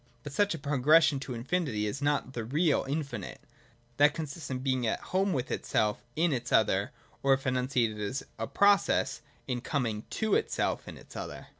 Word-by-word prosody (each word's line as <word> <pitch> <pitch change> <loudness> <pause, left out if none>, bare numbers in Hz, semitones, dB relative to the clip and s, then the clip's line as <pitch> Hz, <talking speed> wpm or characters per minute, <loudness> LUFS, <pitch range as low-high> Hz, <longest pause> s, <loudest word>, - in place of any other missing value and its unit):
But 145 - -7
such 205 +3 +2
a - - -6
progression 150 +1 +4
to 135 -2 -5
infinity 120 -4 -1
is 120 +7 -3
not 145 -2 0
the 115 - -3
real 150 +7 +1
infinite. 140 - -4 0.6
That 145 +1 +5
consists 155 -1 -5
in 130 - -2
being 130 -2 0
at - - 0
home 195 +1 0
with 130 -6 -2
itself 105 -1 0
in 165 0 +2
its 120 -2 -3
other, - - +3 0.3
or, 135 -1 +5
if 135 - -9
enunciated 125 -4 0
as 105 +7 -3 0.2
a 115 - -2
process, 200 - +3 0.3
in 125 -2 -2
coming 115 -7 -2
to 220 -2 -1
itself - - 0
in - - -8
its - - -15
other. - - -7
135 Hz, 180 wpm, -30 LUFS, 120-155 Hz, 0.6 s, That